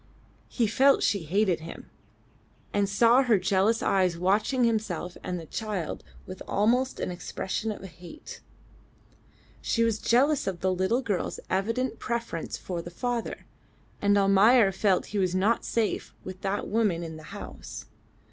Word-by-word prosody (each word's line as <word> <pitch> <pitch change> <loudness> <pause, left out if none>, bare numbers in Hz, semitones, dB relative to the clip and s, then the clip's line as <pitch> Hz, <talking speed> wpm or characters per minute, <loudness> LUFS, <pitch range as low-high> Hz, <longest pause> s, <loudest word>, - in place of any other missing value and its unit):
He 235 - 0
felt 270 +6 +4
she 200 -6 +1
hated 190 +1 +1
him, 165 +1 -10 0.8
and 200 -1 +1
saw 230 +5 +5
her 240 -5 +3
jealous 195 +4 +1
eyes 185 -3 +2
watching 210 +8 +1
himself 210 -6 -1
and 180 -1 -3
the 165 - -9
child 205 -2 -4 0.2
with 185 0 -9
almost 245 +6 +1
an - - -2
expression 190 +4 -4
of 205 - -8
hate. 185 - -11 1.2
She 230 - +1
was 225 -2 +1
jealous 275 +5 +2
of 185 -3 -3
the 185 0 +1
little 190 +8 0
girl's 205 -7 -2
evident 230 +5 -1
preference 235 -9 -3
for 175 -2 -5
the 175 - -8
father, 240 +6 -3 0.6
and 205 0 +3
Almayer 200 +2 +5
felt 190 -1 +1
he 205 - 0
was 185 -1 +1
not 205 +5 +2
safe 225 -2 -2
with 185 0 -8
that 200 +1 -2
woman 205 -6 +1
in 160 -1 -7
the - - -11
house. - - -8
200 Hz, 150 wpm, -27 LUFS, 185-230 Hz, 1.2 s, saw